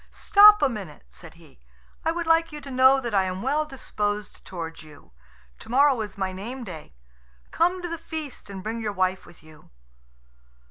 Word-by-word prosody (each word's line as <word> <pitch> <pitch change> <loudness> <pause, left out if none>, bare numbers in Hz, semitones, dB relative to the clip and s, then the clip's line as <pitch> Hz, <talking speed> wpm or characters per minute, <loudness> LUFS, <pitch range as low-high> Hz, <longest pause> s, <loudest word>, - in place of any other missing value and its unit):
"Stop 420 -2 +6
a - - +5
minute," 200 - -8
said 165 -2 -13
he; 160 - -20 0.4
"I 325 - +1
would 345 +1 -3
like 330 0 +3
you 300 - -7
to 275 -1 -9
know 260 +1 +5
that 240 -4 -5
I 195 -2 +3
am 185 +2 -4
well 295 +4 0
disposed 210 -7 -4
towards 165 -3 -7
you. 155 - -17 0.5
To - - -13
morrow 265 0 +4
is 210 -3 -7
my 190 -1 -2
name 235 +8 -7
day. 160 - -10 0.6
Come 355 +2 +1
to - - -2
the 335 -1 -5
feast, 315 -8 -7
and 190 -2 -8
bring 225 +2 -4
your 215 -2 -3
wife 185 -1 -1
with 175 - -18
you." 155 -1 -18
225 Hz, 190 wpm, -25 LUFS, 185-295 Hz, 0.6 s, Stop